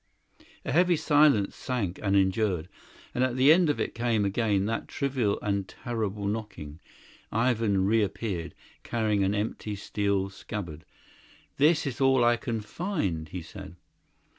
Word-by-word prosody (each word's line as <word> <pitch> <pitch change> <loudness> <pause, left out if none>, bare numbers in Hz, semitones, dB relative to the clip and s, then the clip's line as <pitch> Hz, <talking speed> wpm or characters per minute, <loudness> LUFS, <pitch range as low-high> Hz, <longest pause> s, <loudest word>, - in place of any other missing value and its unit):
A - - -2
heavy 175 +3 +4
silence 145 -9 +3
sank 105 -9 -3
and 100 -1 +1
endured, 95 -3 +1 0.5
and 125 - +1
at 130 -1 0
the 135 +4 +7
end 175 -1 +3
of 145 - 0
it - - -2
came 115 -3 0
again 100 -1 +1
that 115 +2 -2
trivial 130 -7 -1
and 100 -2 -1
terrible 105 -4 -4
knocking. 100 -8 -5 0.5
Ivan 110 -4 +1
reappeared, 100 -4 -1 0.3
carrying 110 -4 0
an 95 +2 +1
empty 105 0 -3
steel 100 -1 -1
scabbard. 85 -6 -7 0.7
"This 155 +3 +4
is 135 -1 -4
all 135 -2 +4
I 120 0 +5
can 115 -1 -3
find," 105 - -3
he 90 -2 -6
said. 80 +1 -10
105 Hz, 140 wpm, -28 LUFS, 95-125 Hz, 0.7 s, the